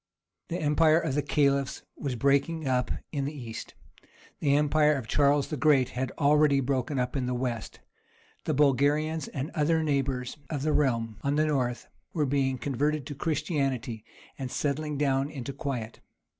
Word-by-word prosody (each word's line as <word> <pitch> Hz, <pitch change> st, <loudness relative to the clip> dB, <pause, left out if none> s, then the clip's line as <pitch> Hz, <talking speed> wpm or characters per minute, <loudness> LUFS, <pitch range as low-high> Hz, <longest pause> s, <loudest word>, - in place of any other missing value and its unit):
The 170 Hz, -, -3 dB
empire 155 Hz, +1 st, +4 dB
of 135 Hz, -, -2 dB
the 145 Hz, -, +1 dB
Caliphs 140 Hz, -1 st, +1 dB
was 135 Hz, -4 st, -3 dB
breaking 140 Hz, +5 st, +1 dB
up 125 Hz, -1 st, +1 dB, 0.2 s
in 140 Hz, -3 st, -2 dB
the 150 Hz, +2 st, -4 dB
East—the 140 Hz, +5 st, -5 dB
empire 150 Hz, +1 st, +3 dB
of 130 Hz, -5 st, -5 dB
Charles 145 Hz, +1 st, +3 dB
the 150 Hz, -, -3 dB
Great 140 Hz, -3 st, +4 dB
had 130 Hz, +1 st, -3 dB
already 145 Hz, -1 st, +4 dB
broken 135 Hz, +1 st, -1 dB
up 125 Hz, +1 st, -1 dB
in 130 Hz, -3 st, -1 dB
the 125 Hz, -, -1 dB
West—the 120 Hz, +4 st, -6 dB
Bulgarians 145 Hz, +3 st, +2 dB
and 135 Hz, +3 st, -4 dB
other 160 Hz, +1 st, +1 dB
neighbours 135 Hz, -3 st, -1 dB
of 145 Hz, -4 st, -3 dB
the 155 Hz, 0 st, +1 dB
realm 115 Hz, -6 st, +1 dB
on 140 Hz, +1 st, 0 dB
the 155 Hz, +1 st, +3 dB
north 125 Hz, -5 st, -1 dB, 0.3 s
were 155 Hz, -4 st, +1 dB
being 135 Hz, -1 st, +1 dB
converted 145 Hz, +2 st, -1 dB
to 145 Hz, -, -5 dB
Christianity, 135 Hz, -, -2 dB, 0.4 s
and 130 Hz, -2 st, -3 dB
settling 150 Hz, +2 st, -2 dB
down 135 Hz, -1 st, +1 dB
into 140 Hz, -2 st, -6 dB
quiet. 125 Hz, -5 st, -4 dB
140 Hz, 155 wpm, -28 LUFS, 130-150 Hz, 0.4 s, empire